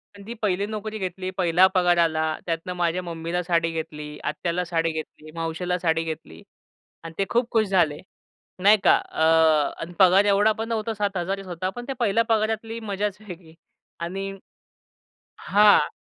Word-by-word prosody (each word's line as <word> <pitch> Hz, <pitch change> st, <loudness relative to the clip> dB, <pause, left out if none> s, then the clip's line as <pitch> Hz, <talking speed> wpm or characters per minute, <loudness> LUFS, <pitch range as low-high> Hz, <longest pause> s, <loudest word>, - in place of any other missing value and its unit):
पण 200 Hz, -, -12 dB
ती 235 Hz, -, -5 dB
पहिली 200 Hz, -1 st, 0 dB
नोकरी 215 Hz, 0 st, -5 dB
घेतली, 185 Hz, 0 st, -4 dB
पहिला 180 Hz, 0 st, +4 dB
पगार 175 Hz, -1 st, +3 dB
आला 160 Hz, -2 st, +2 dB, 0.2 s
त्यातनं 165 Hz, +1 st, -3 dB
माझ्या 175 Hz, +1 st, 0 dB
मम्मीला 170 Hz, +1 st, -3 dB
साडी 170 Hz, -1 st, +1 dB
घेतली, 150 Hz, -2 st, -6 dB
आत्याला 175 Hz, +1 st, -2 dB
साडी 165 Hz, -1 st, 0 dB
घेतली, 155 Hz, 0 st, -8 dB
मावशीला 165 Hz, +2 st, -2 dB
साडी 165 Hz, -1 st, +1 dB
घेतली. 150 Hz, -, -7 dB, 0.6 s
आणि 165 Hz, 0 st, -8 dB
ते 195 Hz, -, +2 dB
खूप 240 Hz, 0 st, +1 dB
खुश 220 Hz, -3 st, +2 dB
झाले. 170 Hz, -6 st, +2 dB, 0.6 s
नाही 210 Hz, +2 st, +7 dB
का. -, -, +6 dB
अ, -, -, -6 dB, 0.6 s
आणि 165 Hz, +2 st, -6 dB
पगार 190 Hz, +2 st, +6 dB
एवढा 205 Hz, +2 st, +4 dB
पण 225 Hz, +1 st, -3 dB
नव्हता 225 Hz, 0 st, -2 dB
7,000च 195 Hz, -2 st, -2 dB
होता 180 Hz, +1 st, -3 dB
पण 245 Hz, 0 st, -7 dB
त्या 270 Hz, -, -4 dB
पहिल्या 230 Hz, 0 st, +2 dB
पगारातली 225 Hz, +1 st, 0 dB
मजाच 205 Hz, -2 st, -3 dB
वेगळी. 170 Hz, -3 st, -11 dB, 0.5 s
आणि, 195 Hz, +3 st, -4 dB, 1.1 s
हां. 205 Hz, +1 st, +4 dB
185 Hz, 155 wpm, -24 LUFS, 165-205 Hz, 1.1 s, नाही